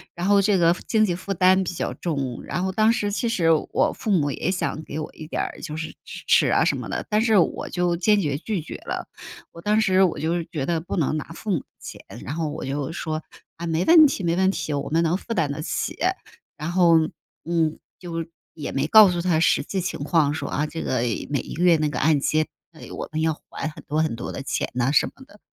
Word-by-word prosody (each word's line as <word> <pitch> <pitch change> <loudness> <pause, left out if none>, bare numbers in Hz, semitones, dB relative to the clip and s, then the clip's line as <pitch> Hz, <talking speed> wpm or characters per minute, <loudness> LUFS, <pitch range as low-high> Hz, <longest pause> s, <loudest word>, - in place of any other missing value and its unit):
然 175 0 -3
后 200 0 +5
这 200 0 +3
个 170 -1 +4
经 220 -1 +3
济 180 - 0
负 185 +3 -6
担 185 +1 +4
比 180 - -4
较 - - -2
重， 140 -7 -3
然 175 +6 -3
后 190 - 0
当 215 +3 +3
时 210 -4 -1
其 230 +3 -1
实 170 -7 +2
我 155 - +1
父 - - -6
母 150 -8 +2
也 160 - -2
想 180 -4 -2
给 155 - -6
我 155 - -5
一 155 - -10
点 - - -2
儿， - - -6
就 155 -3 -5
是 160 0 -4
支 - - -9
持 - - +5
啊 - - +3
什 - - +2
么 - - -6
的， - - -3
但 210 0 +2
是 220 -2 +3
我 175 - +1
就 175 -1 0
坚 205 +4 +3
决 145 -7 -1
拒 205 -2 -3
绝 - - -8
了。 - - -4 0.4
我 170 - -12
当 210 +4 +2
时 190 -3 +3
我 180 - +1
就 160 +2 0
是 170 -1 -3
觉 145 -5 -2
得 165 +1 0
不 175 - -5
能 155 -2 +1
拿 150 - -4
父 215 - -4
母 175 - +2
的 - - -16
钱， - - -9 0.2
然 140 - -4
后 160 -1 -2
我 150 - -5
就 140 +2 -3
说： 155 -1 -3 0.4
“啊， 170 +1 -5
没 165 +2 0
问 320 -2 +8
题， 240 -8 -3
没 170 -1 +1
问 190 +1 +3
题， 155 -5 -2
我 140 - -2
们 165 +2 +2
能 165 +1 +2
负 230 +3 -5
担 155 -6 +1
得 145 - -4
起。” 155 -1 -3 0.6
然 155 +3 -4
后， 175 -2 +5 0.4
嗯， 160 -2 0 0.2
就 165 -2 -4 0.3
也 150 - -6
没 135 +1 0
告 215 +4 +8
诉 175 -1 -1
他 170 -2 +1
实 165 - +3
际 190 -2 -3
情 180 - -4
况 150 -2 +2
说， 145 -3 -4
啊， 150 +1 -1
这 160 +2 -5
个 130 - 0 0.3
每 140 - +1
一 - - -7
个 170 - -1
月 175 -2 +6
那 155 -1 0
个 - - -4
按 155 -2 +3
揭， 155 +3 +1 0.3
唉， 160 - -12
我 - - -6
们 155 - -2
要 160 0 +2 0.2
还 - - -4
很 155 - -9
多 150 +2 0
很 155 - -1
多 120 - -5
的 135 - -6
钱 - - -2
呐， 125 +2 +1
什 145 - +4
么 265 - -14
的。 210 - -19
170 Hz, 275 characters per minute, -24 LUFS, 155-190 Hz, 0.6 s, 问